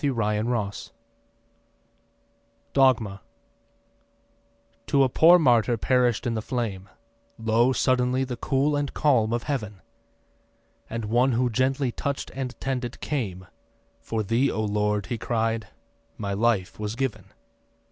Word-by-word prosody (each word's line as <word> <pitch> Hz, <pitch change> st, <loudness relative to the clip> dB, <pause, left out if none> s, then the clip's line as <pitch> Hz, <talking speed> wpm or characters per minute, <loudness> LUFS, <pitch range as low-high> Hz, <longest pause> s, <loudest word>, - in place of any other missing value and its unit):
DOGMA 115 Hz, -8 st, +2 dB, 1.7 s
To 140 Hz, -2 st, +4 dB
a 130 Hz, -, +2 dB
poor 170 Hz, +7 st, +7 dB
martyr 120 Hz, -6 st, +3 dB
perisht 125 Hz, -1 st, +1 dB
in 120 Hz, -, 0 dB
the 110 Hz, -, -2 dB
flame 105 Hz, -6 st, -4 dB, 0.5 s
Lo 115 Hz, +3 st, +2 dB
suddenly 130 Hz, 0 st, +1 dB
the 125 Hz, -2 st, -4 dB
cool 135 Hz, +4 st, 0 dB
and 145 Hz, -1 st, -2 dB
calm 120 Hz, -7 st, +2 dB
of 120 Hz, 0 st, -1 dB
Heaven, 105 Hz, -9 st, -4 dB, 1.1 s
And 115 Hz, -1 st, -4 dB
One 120 Hz, +4 st, +2 dB
who 120 Hz, +1 st, +1 dB
gently 130 Hz, +2 st, 0 dB
touch'd 140 Hz, +3 st, -4 dB
and 130 Hz, -2 st, -5 dB
tended, 125 Hz, -3 st, -3 dB
came. 100 Hz, -11 st, -3 dB, 0.5 s
'For 110 Hz, -1 st, -3 dB
thee, 115 Hz, +7 st, +1 dB
O 110 Hz, -, -2 dB
Lord,' 105 Hz, -1 st, 0 dB
he 115 Hz, +5 st, -4 dB
cried, 115 Hz, -1 st, -1 dB, 0.5 s
'my 100 Hz, -2 st, -3 dB
life 105 Hz, -2 st, 0 dB
was 105 Hz, +1 st, -3 dB
given. 120 Hz, -7 st, -3 dB
120 Hz, 115 wpm, -25 LUFS, 110-130 Hz, 1.7 s, poor